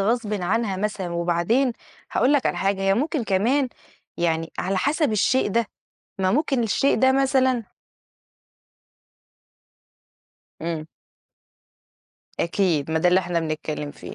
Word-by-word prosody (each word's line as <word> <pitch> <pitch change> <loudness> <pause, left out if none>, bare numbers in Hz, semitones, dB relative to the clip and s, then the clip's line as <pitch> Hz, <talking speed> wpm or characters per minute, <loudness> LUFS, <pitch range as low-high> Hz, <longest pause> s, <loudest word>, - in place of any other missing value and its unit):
غصبٍ 215 +1 0
عنها 205 +1 0
مثلًا؟ 195 -2 -2
وبعدين 175 +10 +1 0.4
هاقول 255 +5 +3
لك 285 - +2
على - - 0
حاجة، 195 0 0
هي 195 0 +3
ممكن 290 - -1
كمان 240 +8 +1 0.5
يعني 165 -1 -1
على 190 +1 -1
حسب 285 - +1
الشيء 230 +5 +2
ده، 230 +2 +1 0.5
ما 185 0 +2
ممكن 270 -2 +1
الشيء 250 +5 +2
ده 260 0 +5
مثلًا 260 -3 +2 3.0
إمم. 165 -2 -4 1.5
أكيد، 165 -4 0
ما 160 - +1
ده 180 +3 +3
اللي 180 +1 +4
إحنا 175 -2 -1
بنتكلّم 155 -2 -4
فيه، - - -10
200 Hz, 125 wpm, -23 LUFS, 175-255 Hz, 3.0 s, ده